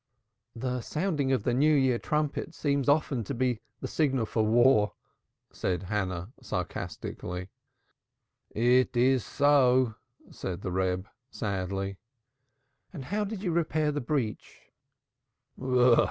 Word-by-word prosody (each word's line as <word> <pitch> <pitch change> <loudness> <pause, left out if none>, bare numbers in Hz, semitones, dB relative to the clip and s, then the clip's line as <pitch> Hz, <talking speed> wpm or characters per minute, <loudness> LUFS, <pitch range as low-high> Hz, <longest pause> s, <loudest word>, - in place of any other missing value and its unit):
"The 125 +1 -2
sounding 150 -2 -1
of 130 -6 +1
the 125 - +1
New 150 +5 +4
Year 130 -4 +3
trumpet 150 +2 -2
seems 140 -2 0
often 145 -5 +2
to - - -4
be 125 -2 0 0.2
the - - -3
signal 135 -7 +1
for 110 - -1
war," 110 -1 +4 0.6
said 90 -1 -2
Hannah, 95 0 -3
sarcastically. 90 +1 -5 1.0
"It 125 +2 +2
is 130 -1 +4
so," 130 -4 +3 0.4
said 95 0 -5
the 95 - -3
Reb, 95 +1 -1 0.2
sadly. 95 -3 -3 0.9
"And 145 -8 -7
how 210 +8 -1
did 205 -1 -5
you 180 - 0
repair 155 -2 +1
the 145 0 -2
breach?" 120 -5 -3
125 Hz, 120 wpm, -29 LUFS, 100-145 Hz, 1.0 s, New